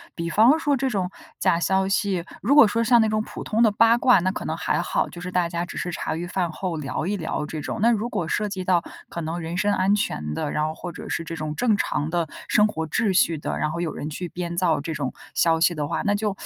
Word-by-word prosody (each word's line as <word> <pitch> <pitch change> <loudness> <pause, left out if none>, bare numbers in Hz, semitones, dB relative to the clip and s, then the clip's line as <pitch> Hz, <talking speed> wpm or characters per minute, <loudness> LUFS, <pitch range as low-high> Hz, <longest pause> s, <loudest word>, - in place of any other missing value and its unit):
比 170 0 -3
方 230 - +5
说 290 -3 +1
这 265 +1 0
种 190 -5 -2 0.3
假 170 - +2
消 190 +2 +2
息 195 -4 0 0.2
如 265 +8 +3
果 295 -5 +9
说 230 +2 0
像 235 0 +5
那 220 - +2
种 215 0 +1
普 - - -8
通 225 +1 0
的 230 - +6
八 230 +3 +4
卦， 245 -2 +5
那 185 +2 0
可 - - -6
能 - - -2
还 - - 0
好， - - -1
就 175 - -10
是 180 +1 -5
大 175 -2 +1
家 170 0 -2
只 - - -10
是 175 - -3
茶 165 - -3
余 170 - -4
饭 180 -1 -1
后 180 -4 -3
聊 150 +1 -3
一 205 +2 -1
聊 160 -2 -3
这 155 0 -5
种， 210 - -4
那 235 - +5
如 225 +1 0
果 200 -7 -2
涉 210 - 0
及 195 -2 -4
到 180 -2 +3 0.3
可 - - -6
能 165 +1 -3
人 165 +2 -4
身 205 +1 +2
安 195 +1 +2
全 75 - -2
的， 150 - -2
然 150 0 0
后 155 - -2
或 175 +1 -7
者 - - -9
是 165 - -2
这 165 - -5
种 155 -1 -4
正 235 -4 +3
常 150 -6 -1
的 170 0 0 0.2
生 210 - +4
活 160 -6 -4
秩 215 +5 +1
序 170 -3 +3
的， - - -3
然 155 - 0
后 170 +2 -3
有 165 - -2
人 150 - -5
去 175 +3 -5
编 170 -1 -5
造 170 -2 +2
这 160 +2 -4
种 140 -4 -3 0.2
消 165 -1 +3
息 170 +2 +3
的 150 -2 -3
话， - - -2
那 205 - +3
就 205 -1 -1
180 Hz, 300 characters per minute, -24 LUFS, 165-210 Hz, 0.3 s, 果